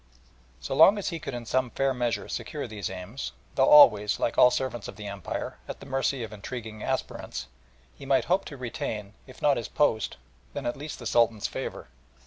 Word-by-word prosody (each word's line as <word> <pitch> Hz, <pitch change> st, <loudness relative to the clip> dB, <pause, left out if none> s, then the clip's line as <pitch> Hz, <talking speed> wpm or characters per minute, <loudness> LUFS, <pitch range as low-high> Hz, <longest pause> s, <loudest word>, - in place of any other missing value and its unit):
So 65 Hz, -, -4 dB
long 205 Hz, -, +7 dB
as 205 Hz, -, -2 dB
he 165 Hz, -, -4 dB
could 155 Hz, -5 st, -5 dB
in 120 Hz, -1 st, -6 dB
some 130 Hz, +2 st, +1 dB
fair 135 Hz, +2 st, 0 dB
measure 120 Hz, -2 st, -1 dB
secure -, -, -4 dB
these 105 Hz, -3 st, -5 dB
aims, 95 Hz, +8 st, -6 dB, 0.2 s
though 135 Hz, -, +3 dB
always, 105 Hz, -8 st, +7 dB
like -, -, 0 dB
all 125 Hz, -, +7 dB
servants 120 Hz, -4 st, -3 dB
of -, -, -8 dB
the 105 Hz, -, -9 dB
Empire, 100 Hz, -2 st, -5 dB
at -, -, -7 dB
the -, -, -11 dB
mercy 135 Hz, -1 st, -1 dB
of 110 Hz, -1 st, -7 dB
intriguing 110 Hz, 0 st, -7 dB
aspirants, -, -, -3 dB, 0.5 s
he 135 Hz, -, -11 dB
might 135 Hz, -, +3 dB
hope 185 Hz, +2 st, +1 dB
to 140 Hz, -, -8 dB
retain, 105 Hz, -4 st, -4 dB
if 130 Hz, -, -14 dB
not 145 Hz, -2 st, +4 dB
his 115 Hz, -, -3 dB
post, 110 Hz, -7 st, +1 dB, 0.4 s
at 125 Hz, -4 st, -2 dB
least 150 Hz, +2 st, -7 dB
the -, -, -10 dB
Sultan's 115 Hz, -3 st, +2 dB
favour. -, -, -4 dB
120 Hz, 195 wpm, -27 LUFS, 105-135 Hz, 0.5 s, long